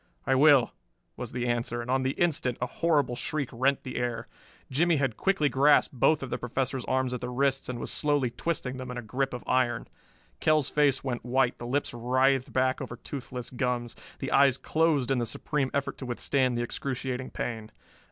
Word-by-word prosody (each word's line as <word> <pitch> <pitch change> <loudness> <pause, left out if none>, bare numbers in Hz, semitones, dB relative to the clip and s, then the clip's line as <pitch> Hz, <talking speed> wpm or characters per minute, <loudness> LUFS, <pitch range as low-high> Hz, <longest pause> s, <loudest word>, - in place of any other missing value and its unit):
"I - - +2
will," 140 -2 +5 0.4
was - - -6
the 125 -1 -2
answer, 120 0 -1
and 120 +1 -4
on 130 0 +2
the 130 +1 -1
instant 145 -7 +1
a 125 - 0
horrible 145 -2 +1
shriek 140 +1 -2
rent 130 +3 +1
the 130 - -6
air. 120 -1 -2 0.4
Jimmie 165 +5 +3
had 135 -6 0
quickly 195 - +2
grasped 140 +2 +4
both 140 +4 +3
of 130 - -6
the - - -2
Professor's 130 +1 -2
arms 130 -1 0
at 125 - -4
the - - -3
wrists 135 +1 0
and 125 - -3
was - - -4
slowly 145 -5 +1
twisting 130 -4 -3
them 130 -1 -6
in 125 - -5
a 120 - -5
grip 130 +5 -1
of 125 - -6
iron. 125 -2 +1 0.5
Kell's 155 -3 +2
face 140 -3 +2
went 125 -3 -3
white, 125 +1 +1
the 120 - -6
lips 140 +2 -1
writhed 130 +2 +1
back 130 +3 +1
over 125 -2 -5
toothless 125 -1 -7
gums, 125 -2 -2 0.2
the 135 - -4
eyes 135 -2 +5
closed 155 -5 +1
in 130 - +2
the 120 - 0
supreme 140 +1 -1
effort 140 -1 -2
to 130 - -6
withstand 125 0 0
the 120 - 0
excruciating 130 0 -3
pain. 110 -2 -5
130 Hz, 200 wpm, -28 LUFS, 125-140 Hz, 0.5 s, will